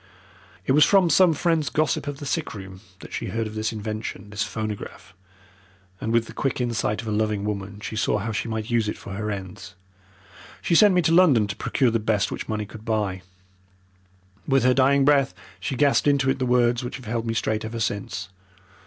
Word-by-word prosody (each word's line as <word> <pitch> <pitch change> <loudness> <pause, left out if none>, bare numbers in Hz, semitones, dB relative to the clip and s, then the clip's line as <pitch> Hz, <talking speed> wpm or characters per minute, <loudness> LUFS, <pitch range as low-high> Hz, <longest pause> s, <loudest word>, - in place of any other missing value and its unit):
"It - - +1
was 150 +2 +6
from 185 -1 +4
some 185 -3 +6
friend's 160 -1 +1
gossip 155 -1 0
of 145 -1 -4
the 145 - -8
sick 155 -2 -2
room 95 -1 -9 0.2
that - - -11
she - - -3
heard 115 0 -2
of 110 - -6
this 110 0 -2
invention 110 -1 -5
this 105 -1 -4
phonograph 105 -3 -5 0.9
and 110 - -3
with 115 0 +2
the - - -11
quick 135 -3 -2
insight 115 -2 -1
of - - -8
a - - -2
loving 105 -1 0
woman 100 -1 -4
she 110 - -5
saw 105 - +1
how 110 +3 -3
she 110 +2 -2
might 110 +1 -4
use 115 -3 +2
it - - -4
for 100 - -9
her 105 +2 -3
ends. 95 -1 -7 0.8
She - - -1
sent 195 +3 +6
me 180 - +3
to 160 - +2
London 155 - +5
to 100 -1 -5
procure 125 +3 +1
the 115 - +1
best 105 -2 0
which - - -5
money 105 -1 -2
could 110 +1 -12
buy. 105 -5 -1 1.3
With 135 -3 +3
her 130 0 +5
dying 135 +1 +4
breath 140 -2 +3 0.2
she 115 +8 -3
gasped 145 +2 +3
into 140 -2 +3
it - - -3
the 130 - 0
words 120 0 +2
which 120 - -5
have 130 - -10
held 115 +1 -2
me 115 - -1
straight 110 -1 -1
ever 115 +1 -5
since. 105 -3 -3
115 Hz, 215 wpm, -24 LUFS, 105-135 Hz, 1.3 s, was